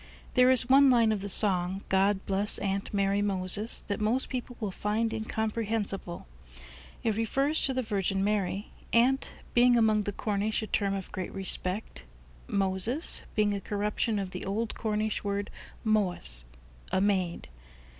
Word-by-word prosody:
There 250 Hz, 0 st, +5 dB
is 255 Hz, -1 st, +3 dB
one 270 Hz, +1 st, +6 dB
line 230 Hz, -3 st, +4 dB
of 210 Hz, -2 st, -1 dB
the 200 Hz, -, -5 dB
song, 190 Hz, -1 st, +1 dB
"God 195 Hz, +1 st, +1 dB
bless 200 Hz, +1 st, +3 dB
Aunt 195 Hz, 0 st, -2 dB
Mary 200 Hz, 0 st, +1 dB
Moses," 200 Hz, +2 st, +2 dB
that 200 Hz, 0 st, -4 dB
most 230 Hz, +5 st, +2 dB
people 250 Hz, -1 st, -5 dB
will 210 Hz, -4 st, -3 dB
find 215 Hz, +4 st, -1 dB
incomprehensible. 220 Hz, -4 st, -3 dB, 0.8 s
It 225 Hz, -3 st, +1 dB
refers 275 Hz, +8 st, 0 dB
to 265 Hz, -, 0 dB
the 255 Hz, -, 0 dB
Virgin 195 Hz, -3 st, -1 dB
Mary, 200 Hz, -1 st, -1 dB, 0.2 s
"Aunt" 255 Hz, +4 st, +2 dB, 0.2 s
being 245 Hz, 0 st, +5 dB
among 215 Hz, -2 st, +3 dB
the 205 Hz, -, -1 dB
Cornish 210 Hz, +2 st, -2 dB
a -, -, -2 dB
term 200 Hz, -2 st, 0 dB
of 195 Hz, -2 st, -6 dB
great 185 Hz, -, -5 dB
respect; 190 Hz, -, -3 dB, 0.4 s
"Moses" 195 Hz, -, 0 dB
being 210 Hz, -1 st, +2 dB
a 200 Hz, -, -3 dB
corruption 210 Hz, +2 st, -1 dB
of 195 Hz, -2 st, -3 dB
the 180 Hz, -, -6 dB
old 215 Hz, +4 st, -2 dB
Cornish 215 Hz, -1 st, -2 dB
word 200 Hz, 0 st, -3 dB, 0.3 s
"Mowes," 180 Hz, -, +1 dB, 0.5 s
a -, -, +2 dB
maid. 190 Hz, -3 st, 0 dB
205 Hz, 155 wpm, -29 LUFS, 195-225 Hz, 0.8 s, one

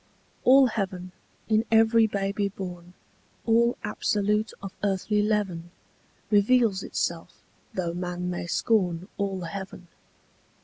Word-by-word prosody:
All 265 Hz, +1 st, +7 dB
heaven, 190 Hz, -6 st, -3 dB, 0.4 s
in 220 Hz, 0 st, +3 dB
every 225 Hz, 0 st, +5 dB
baby 200 Hz, 0 st, -1 dB
born, 180 Hz, -2 st, -8 dB, 0.5 s
All 235 Hz, +1 st, +3 dB
absolute 210 Hz, +1 st, 0 dB
of 195 Hz, -1 st, -7 dB
earthly 205 Hz, +1 st, +1 dB
leaven, 200 Hz, -5 st, -1 dB, 0.6 s
Reveals 210 Hz, -1 st, +3 dB
itself, -, -, -4 dB, 0.3 s
though 175 Hz, -2 st, -2 dB
man 180 Hz, 0 st, -4 dB
may 175 Hz, -1 st, -4 dB
scorn 180 Hz, -3 st, +1 dB
All 195 Hz, -2 st, -2 dB
heaven. 185 Hz, +1 st, -7 dB
200 Hz, 105 wpm, -26 LUFS, 180-220 Hz, 0.6 s, All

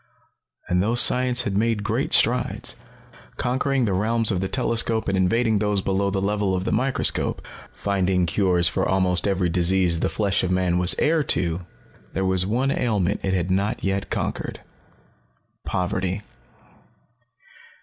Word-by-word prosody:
And 90 Hz, 0 st, +1 dB
though 110 Hz, +5 st, 0 dB
science 125 Hz, +1 st, +4 dB
had 100 Hz, -3 st, -3 dB
made 110 Hz, 0 st, 0 dB
great -, -, -1 dB
strides, -, -, +1 dB, 0.6 s
conquering 130 Hz, +1 st, 0 dB
the 100 Hz, -, -1 dB
realms 110 Hz, +3 st, +1 dB
of 90 Hz, -2 st, -1 dB
the 95 Hz, -, -1 dB
telescope 115 Hz, -1 st, 0 dB
and 95 Hz, -, 0 dB
invading 110 Hz, +4 st, +1 dB
those 105 Hz, -1 st, 0 dB
below 100 Hz, +1 st, 0 dB
the 95 Hz, 0 st, -1 dB
level 100 Hz, -1 st, 0 dB
of 90 Hz, -, -2 dB
the -, -, -1 dB
microscope, 130 Hz, +1 st, 0 dB, 0.3 s
finding 95 Hz, -2 st, 0 dB
cures 90 Hz, -1 st, +2 dB
for 85 Hz, -, -1 dB
almost 90 Hz, -1 st, +1 dB
every 95 Hz, -2 st, +1 dB
disease 90 Hz, 0 st, +2 dB
the -, -, 0 dB
flesh 100 Hz, -2 st, 0 dB
of 90 Hz, -, -1 dB
man 90 Hz, -1 st, +1 dB
was 90 Hz, 0 st, +3 dB
heir 155 Hz, 0 st, +2 dB
to, 85 Hz, -3 st, -1 dB, 0.5 s
there 95 Hz, -, -1 dB
was 95 Hz, 0 st, +1 dB
one 125 Hz, +6 st, 0 dB
ailment 105 Hz, -7 st, 0 dB
it 95 Hz, -1 st, -1 dB
had 90 Hz, 0 st, -1 dB
not 100 Hz, +3 st, -1 dB
yet 100 Hz, 0 st, -2 dB
conquered -, -, -4 dB, 1.1 s
poverty. 90 Hz, +2 st, -2 dB
95 Hz, 150 wpm, -23 LUFS, 90-110 Hz, 1.1 s, science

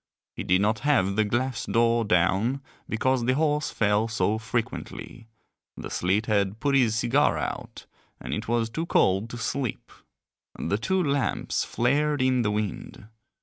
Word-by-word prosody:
He -, -, -5 dB
did 90 Hz, +1 st, +2 dB
not 110 Hz, +2 st, +1 dB
have 100 Hz, -10 st, +2 dB
the 110 Hz, -, +3 dB
glass 120 Hz, +4 st, -2 dB
door 115 Hz, 0 st, +2 dB
down 100 Hz, +7 st, +1 dB, 0.3 s
because 130 Hz, +3 st, +1 dB
the 130 Hz, +1 st, +2 dB
horse 150 Hz, 0 st, +1 dB
fell 105 Hz, +1 st, +1 dB
so 110 Hz, -1 st, 0 dB
frequently, 115 Hz, +1 st, -5 dB, 0.5 s
the -, -, -7 dB
sleet 95 Hz, +5 st, 0 dB
had 100 Hz, -1 st, 0 dB
put 140 Hz, +3 st, 0 dB
his 120 Hz, -5 st, +3 dB
cigar 120 Hz, -, +2 dB
out -, -, -5 dB, 0.3 s
and -, -, -5 dB
it -, -, -4 dB
was 115 Hz, -1 st, 0 dB
too 165 Hz, +7 st, -3 dB
cold 95 Hz, -, +2 dB
to 120 Hz, -, -7 dB
sleep; 120 Hz, +1 st, -3 dB, 0.7 s
the 100 Hz, -, -1 dB
two 185 Hz, +10 st, +1 dB
lamps 140 Hz, -3 st, 0 dB
flared 145 Hz, +4 st, +1 dB
in 130 Hz, -1 st, +2 dB
the 105 Hz, -, 0 dB
wind. 105 Hz, 0 st, -4 dB
115 Hz, 155 wpm, -26 LUFS, 105-130 Hz, 0.7 s, the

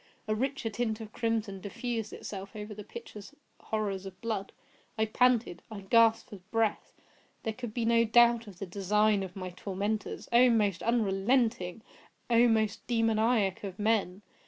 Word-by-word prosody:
A 215 Hz, -, +1 dB
richer 250 Hz, 0 st, -2 dB
tint 220 Hz, 0 st, -2 dB
of 220 Hz, -1 st, -9 dB
crimson 225 Hz, -4 st, -2 dB
diffused 225 Hz, +2 st, -4 dB
itself 195 Hz, +1 st, -8 dB
over 210 Hz, 0 st, -6 dB
the 210 Hz, 0 st, -8 dB
pictured 215 Hz, -, -10 dB, 0.3 s
horrors 200 Hz, -3 st, -3 dB
of 185 Hz, -1 st, -11 dB
blood. 215 Hz, -3 st, -3 dB, 0.5 s
I 220 Hz, -, +2 dB
panted! 230 Hz, -5 st, +2 dB
I 215 Hz, -3 st, -7 dB
gasped 225 Hz, +3 st, +3 dB
for 205 Hz, -, -7 dB
breath! 225 Hz, -1 st, -1 dB, 0.5 s
There 220 Hz, -, -2 dB
could 240 Hz, 0 st, -6 dB
be 230 Hz, +1 st, -2 dB
no 230 Hz, 0 st, +4 dB
doubt 235 Hz, 0 st, +4 dB
of 195 Hz, -4 st, -11 dB
the 195 Hz, -, -5 dB
design 205 Hz, +2 st, +2 dB
of 185 Hz, -2 st, -6 dB
my 185 Hz, -2 st, -5 dB
tormentors—oh! 210 Hz, +6 st, +1 dB
most 205 Hz, -6 st, +2 dB
unrelenting! 220 Hz, -2 st, +1 dB, 0.5 s
oh! 235 Hz, +1 st, +6 dB
most 220 Hz, -2 st, 0 dB
demoniac 225 Hz, -4 st, +1 dB
of 195 Hz, -2 st, -6 dB
men! 205 Hz, -3 st, 0 dB
215 Hz, 155 wpm, -30 LUFS, 200-230 Hz, 0.5 s, oh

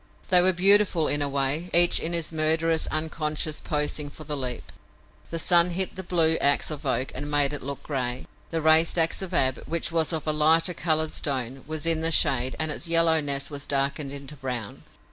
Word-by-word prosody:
They 180 Hz, -2 st, +6 dB
were 185 Hz, +1 st, +4 dB
beautiful 190 Hz, -2 st, +3 dB
in 145 Hz, -, 0 dB
a 145 Hz, -, -1 dB
way, 140 Hz, +5 st, -1 dB
each 175 Hz, 0 st, +5 dB
in 170 Hz, -, -3 dB
his 170 Hz, -1 st, -1 dB
murderous, 160 Hz, +1 st, 0 dB
unconscious 155 Hz, -1 st, -2 dB
posing 150 Hz, -1 st, -2 dB
for 155 Hz, -, -11 dB
the 150 Hz, 0 st, -5 dB
leap. 125 Hz, -4 st, -5 dB, 0.6 s
The 165 Hz, -, -4 dB
sun 170 Hz, +1 st, +4 dB
hit 185 Hz, +2 st, -2 dB
the 190 Hz, -, -6 dB
blue 165 Hz, -3 st, +1 dB
ax 145 Hz, +2 st, +1 dB
of 145 Hz, -2 st, -6 dB
Oak 130 Hz, 0 st, -1 dB
and 145 Hz, -, -5 dB
made 145 Hz, -1 st, +1 dB
it 145 Hz, -, -6 dB
look 140 Hz, +1 st, -7 dB
a -, -, -26 dB
gray. 130 Hz, -3 st, -4 dB, 0.2 s
The 165 Hz, -1 st, -3 dB
raised 160 Hz, +2 st, +4 dB
ax 165 Hz, +2 st, +2 dB
of 190 Hz, -1 st, -4 dB
Ab, 130 Hz, -7 st, +1 dB
which 170 Hz, 0 st, 0 dB
was 165 Hz, -1 st, +1 dB
of 160 Hz, -3 st, -4 dB
a 155 Hz, -, 0 dB
lighter 160 Hz, +3 st, +3 dB
colored 160 Hz, -1 st, -1 dB
stone, 130 Hz, -2 st, -3 dB
was 155 Hz, 0 st, -5 dB
in 165 Hz, -1 st, +2 dB
the 165 Hz, -, +1 dB
shade 130 Hz, -5 st, +2 dB
and 155 Hz, -1 st, -1 dB
its 160 Hz, -, -5 dB
yellowness 160 Hz, -4 st, +1 dB
was 145 Hz, 0 st, -6 dB
darkened 140 Hz, +1 st, -1 dB
into 140 Hz, +1 st, -8 dB
brown. 125 Hz, -6 st, -6 dB
155 Hz, 205 wpm, -25 LUFS, 140-165 Hz, 0.6 s, They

